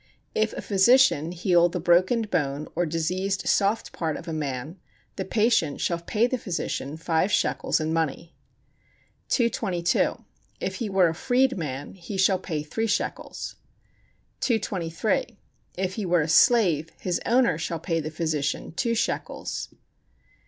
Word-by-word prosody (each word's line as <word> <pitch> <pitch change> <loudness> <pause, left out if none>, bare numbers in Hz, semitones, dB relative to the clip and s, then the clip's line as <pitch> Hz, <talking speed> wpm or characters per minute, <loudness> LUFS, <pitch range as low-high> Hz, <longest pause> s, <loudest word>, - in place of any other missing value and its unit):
If 220 0 +1
a - - -6
physician 200 - +4
heal 175 -1 +3
the 180 - -3
broken 185 +7 +3
bone 150 -7 -1
or 175 +1 +1
diseased 185 +5 -1
soft 205 +3 +1
part 160 -3 -2
of - - -10
a 165 - -3
man, 150 +3 -4 0.4
the 190 - -3
patient 210 -7 +1
shall 170 -1 0
pay 210 +7 +1
the 250 0 -1
physician 160 -6 -3
five 165 +4 0
shekels - - +1
in 155 0 -1
money. 165 +1 -2 1.0
222. 195 -8 +1 0.3
If - - -3
he 230 -5 -3
were 190 -2 +4
a - - -2
freed 260 +7 +2
man 145 -5 -5
he 195 +2 -7
shall 190 0 +3
pay 155 -5 -3
three 225 +9 -2
shekels. 205 - -3 0.8
223. 220 +2 -1 0.4
If 185 0 -1
he 205 -3 -3
were 175 -1 +3
a 150 - -1
slave 165 -3 +4
his 180 -2 -1
owner 235 -9 +3
shall 165 0 -2
pay 165 0 -1
the 155 -1 -4
physician 155 -3 -2
two 230 +8 0
shekels. 225 - -3
180 Hz, 145 wpm, -25 LUFS, 160-215 Hz, 1.0 s, physician